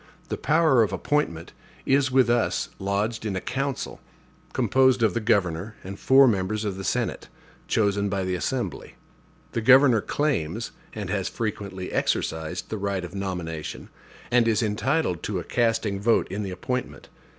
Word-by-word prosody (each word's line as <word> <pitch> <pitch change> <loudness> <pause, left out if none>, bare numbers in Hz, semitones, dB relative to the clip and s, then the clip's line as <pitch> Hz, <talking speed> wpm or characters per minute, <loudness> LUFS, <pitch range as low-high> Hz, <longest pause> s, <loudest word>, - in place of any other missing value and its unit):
The - - -1
power 155 -5 +3
of 105 -4 +2
appointment 95 - -1 0.3
is 135 0 +3
with 130 -1 +4
us 120 -1 +1
lodged 100 +4 -1
in 105 -3 -2
a - - 0
council, 135 +3 -3 0.5
composed 130 -2 +3
of 110 - +3
the 120 - 0
governor 100 -1 0
and 95 +1 -8
four 135 0 +6
members 105 0 0
of 100 -2 -2
the 95 - -6
Senate, 80 - -2 0.4
chosen 100 -2 +1
by 95 -1 -1
the 95 0 -1
Assembly. 95 - -3 0.6
The 115 - -2
governor 130 -1 +6
claims, 115 - -1 0.2
and 105 -4 -5
has 95 -2 -1
frequently 100 -4 -4
exercised, 80 +2 -1
the 110 - -4
right 100 -2 -2
of 90 - -10
nomination, 90 -5 -5 0.4
and 120 -1 +4
is 115 0 +2
entitled 110 - 0
to 105 - -3
a 90 - -3
casting 110 -1 0
vote 115 +2 +3
in 100 - -3
the 100 - -4
appointment. 95 - -4
105 Hz, 160 wpm, -25 LUFS, 95-120 Hz, 0.6 s, four